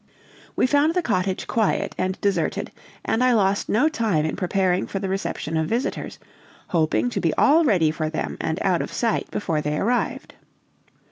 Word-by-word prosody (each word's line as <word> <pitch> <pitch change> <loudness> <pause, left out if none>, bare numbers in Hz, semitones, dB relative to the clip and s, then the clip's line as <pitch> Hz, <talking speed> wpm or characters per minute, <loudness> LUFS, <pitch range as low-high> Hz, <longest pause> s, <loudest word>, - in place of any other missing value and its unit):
We - - +3
found 290 +5 +2
the 360 - +1
cottage 185 -5 -1
quiet 220 -3 0
and 185 +1 -2
deserted; 200 -1 -1 0.3
and 230 - +1
I 255 -1 +4
lost 200 -2 +1
no 250 +9 +3
time 215 - 0
in 155 - -2
preparing 185 -1 0
for - - -4
the 195 0 -3
reception 190 -4 -3
of 160 0 0
visitors, 235 +8 -3 0.5
hoping 155 -9 +1
to - - -2
be 165 - +1
all 310 +4 +5
ready 180 - +3
for 155 0 -3
them 155 - -3
and 160 +1 -2
out 180 -3 +2
of - - -5
sight 230 -2 -1
before 160 -6 -2
they 150 0 -2
arrived. 240 +7 -1
195 Hz, 180 wpm, -23 LUFS, 160-230 Hz, 0.5 s, all